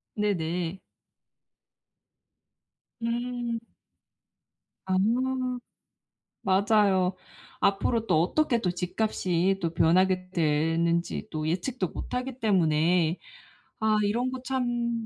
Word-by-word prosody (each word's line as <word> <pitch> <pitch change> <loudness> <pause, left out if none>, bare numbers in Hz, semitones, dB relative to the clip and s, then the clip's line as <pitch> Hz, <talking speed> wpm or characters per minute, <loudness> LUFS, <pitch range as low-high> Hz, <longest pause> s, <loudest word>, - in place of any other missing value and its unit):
네네. 180 -3 -1 2.2
음. 240 0 -2 1.3
아. 190 - -1 1.5
맞아요. 195 -1 +3 0.5
앞으로 220 +3 +1
또 160 -4 +4
어떻게 240 - +1
또 180 - +1
집값이 185 0 0
또 165 -1 -1
변하게 185 +3 +3
되는지 165 +3 +1
또 155 -1 -3
예측도 185 +4 -1
못하기 250 +6 -5
때문에 170 -4 +2 0.6
아 220 -1 +2
이런 235 +5 0
거 260 -1 -5
참 240 -3 -1
190 Hz, 160 characters per minute, -27 LUFS, 170-230 Hz, 2.2 s, 또